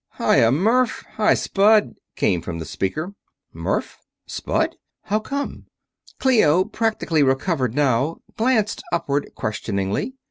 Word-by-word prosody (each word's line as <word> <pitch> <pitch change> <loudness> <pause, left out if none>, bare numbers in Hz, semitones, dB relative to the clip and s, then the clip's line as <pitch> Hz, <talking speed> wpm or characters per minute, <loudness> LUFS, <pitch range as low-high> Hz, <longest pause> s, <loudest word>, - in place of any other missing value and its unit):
"Hi - - +3
ya, 115 - +5
Murf! 225 - +2
Hi, 215 0 +4
Spud!" 210 +2 +3 0.2
came 90 -4 +1
from 85 0 -5
the 80 - -5
speaker. 155 - -3 0.4
"Murf? - - -2 0.3
Spud? - - -2 0.3
How 215 0 0
come?" 280 +6 -5 0.5
Clio, 185 - +4
practically 215 -8 0
recovered 135 - +1
now, 140 +2 +1 0.2
glanced 225 -2 +1
upward 145 -4 -1
questioningly. 105 - -2
165 Hz, 115 wpm, -22 LUFS, -, 0.5 s, ya